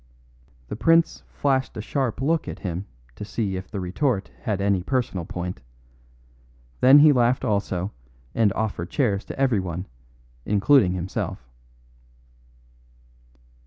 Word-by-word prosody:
The - - -5
prince 165 +9 +3
flashed 135 -4 0
a - - -4
sharp 130 +1 -2
look 160 +3 +1
at - - -5
him 90 +1 -4 0.3
to - - -7
see 105 -2 -2
if 95 0 -6
the 100 - -4
retort 95 +4 -1
had 105 -3 -1
any 100 -2 +1
personal 110 -6 -2
point; 90 -4 -5 1.2
then 130 +3 +8
he 150 +1 +8
laughed 125 -1 +2
also 100 -2 -1 0.4
and 110 -3 +3
offered 100 -6 -3
chairs 105 -6 0
to - - -8
everyone, 95 -9 0 0.6
including 105 - +4
himself. 90 -8 -4
105 Hz, 125 wpm, -24 LUFS, 95-130 Hz, 1.2 s, then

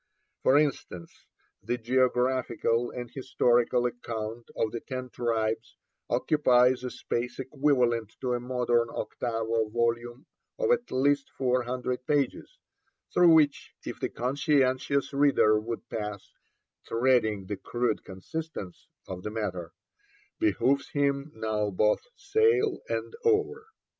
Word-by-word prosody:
For 135 - +5
instance, 135 - -2 0.3
the 120 - -2
geographical 125 -1 +1
and 120 -1 -6
historical 125 -2 +2
account 115 -1 -5
of 110 - 0
the 115 - -4
Ten 130 0 -6
Tribes 115 0 -1 0.3
occupies 125 -1 +3
a 125 - -2
space 120 0 -3
equivalent 125 -5 +1
to 125 -1 0
a 120 - 0
modern 120 -1 +1
octavo 115 -2 -2
volume 120 +2 -1 0.3
of 480 -2 +1
at 485 0 +1
least 140 +1 +2
four 125 -1 +2
hundred 125 0 -3
pages, 145 - -1 0.6
through 175 -1 +6
which, 150 -3 +3
if - - -6
the - - -2
conscientious 135 +1 +1
reader 140 -6 +4
would 115 +1 -6
pass 105 -2 -6 0.5
'treading 115 -5 +2
the 100 +1 -4
crude 120 +2 -1
consistence' 100 - -7 0.2
of 90 -1 -6
the 105 - -4
matter, 95 -6 -4 0.7
'behoves 130 +7 +2
him 140 0 0
now 110 -1 -1
both 105 +2 +2
sail 440 -4 +2
and - - -3
oar.' 435 0 +1
125 Hz, 120 wpm, -28 LUFS, 115-140 Hz, 0.7 s, through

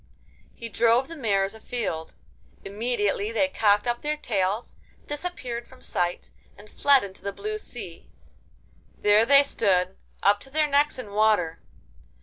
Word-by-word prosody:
He 230 - -7
drove 230 +3 +2
the 330 - -9
mares 200 -7 0
afield. 220 -8 -4 0.5
Immediately 205 0 -1
they 280 +5 +2
cocked 205 -5 +2
up 240 0 -1
their 300 0 -2
tails, 205 -4 -2 0.3
disappeared 290 -7 -5
from 260 -1 -18
sight, 175 0 -2 0.3
and 205 - -14
fled 280 -4 +4
into 195 -1 -9
the 200 - -3
blue 430 - -4
sea. - - -9 0.9
There 210 +2 +4
they 280 +1 +7
stood, 190 -8 +1 0.3
up 205 +1 +4
to 270 - -12
their 305 +2 +2
necks 290 0 +2
in 215 -6 -8
water. 205 -6 +2
225 Hz, 140 wpm, -25 LUFS, 200-275 Hz, 0.9 s, they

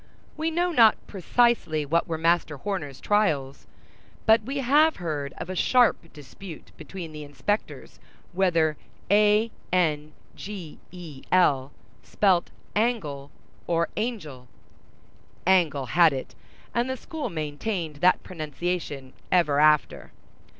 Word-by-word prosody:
We 315 +1 -1
know 350 +2 0
not 230 -8 +6
precisely 195 -6 +1
what 165 +5 +1
were 165 -2 -2
Master 165 -2 +1
Horner's 145 -6 -5
trials; 155 -11 0 0.6
but 220 +1 +5
we 275 +2 -5
have 290 +5 +4
heard 150 -5 -4
of - - -6
a 185 - -5
sharp 240 -5 +2
dispute 155 +4 -12
between 165 +1 -8
the 150 -1 -8
inspectors 145 +9 -4 0.3
whether 165 -5 +2 0.3
a 210 +2 +4 0.2
n 155 -4 0 0.2
g 190 -6 -8
e 165 -7 -10
l 145 -7 +3 0.3
spelt 185 -4 +1 0.3
angle 170 - -1 0.4
or 170 0 +1
angel. 175 - -4 1.0
Angle 165 -7 +3
had 165 +4 +4
it, 130 - -6 0.4
and 240 +2 0
the 260 - -3
school 320 +1 -5
maintained 155 +1 -4
that 180 +5 +3
pronunciation 155 -4 -5 0.2
ever 150 -6 +3
after. 150 0 +2
170 Hz, 120 wpm, -25 LUFS, 150-210 Hz, 1.0 s, not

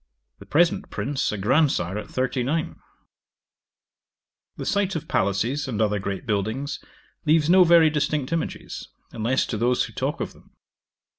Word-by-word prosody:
The - - -13
present 165 +3 +2
Prince 140 -1 -2
a 105 - -3
grandsire 110 - +2
at 105 - -5
thirty 130 0 -1
nine. 155 +6 -2 1.8
'The - - -5
sight 200 -2 0
of 160 0 -4
palaces, 115 +9 0
and 115 -5 -3
other 105 -2 +1
great 95 0 -4
buildings, 115 +7 -2 0.4
leaves 155 +1 +4
no 185 0 +8
very 165 -2 +6
distinct 150 -1 -1
images, 165 - -4 0.2
unless 120 +4 0
to 110 - -3
those 120 +3 +2
who - - -7
talk - - -2
of - - -4
them. - - -22
135 Hz, 150 wpm, -24 LUFS, 110-160 Hz, 1.8 s, no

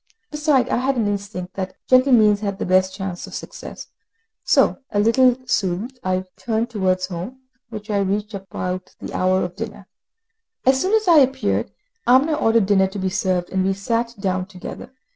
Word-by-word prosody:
Besides, 300 -4 +2
I - - +2
had 260 +2 0
an 220 -3 +1
instinct 200 -3 -4
that 190 -1 -5
gentle 255 +1 +5
means 210 -4 +5
had 200 -2 -3
the - - -3
best 185 +1 +3
chance 190 -3 -5
of - - -9
success; - - -8 0.6
so, - - +3
a 205 - 0
little 245 +3 +4
soothed, 225 +2 -1
I 185 0 0
turned 230 +1 -2
towards 185 -4 0
home, 185 +9 -7 0.3
which 215 -1 -7
I 205 - +1
reached 205 +2 -1
about 185 -1 -5
the - - -7
hour 185 +1 +2
of 180 0 -5
dinner. 210 -2 -7 0.8
As 265 +1 +4
soon 390 +4 +2
as 435 -2 +1
I 335 -3 +7
appeared, 265 -1 +1 0.4
Amina 265 +6 +5
ordered 225 -7 +3
dinner 190 -1 +3
to 195 +2 -8
be 190 -1 -1
served, 185 -3 -1
and 190 0 +1
we 195 +1 +1
sat 230 +4 -2
down 185 -2 -1
together. 190 +5 -9
205 Hz, 180 wpm, -21 LUFS, 190-245 Hz, 0.8 s, I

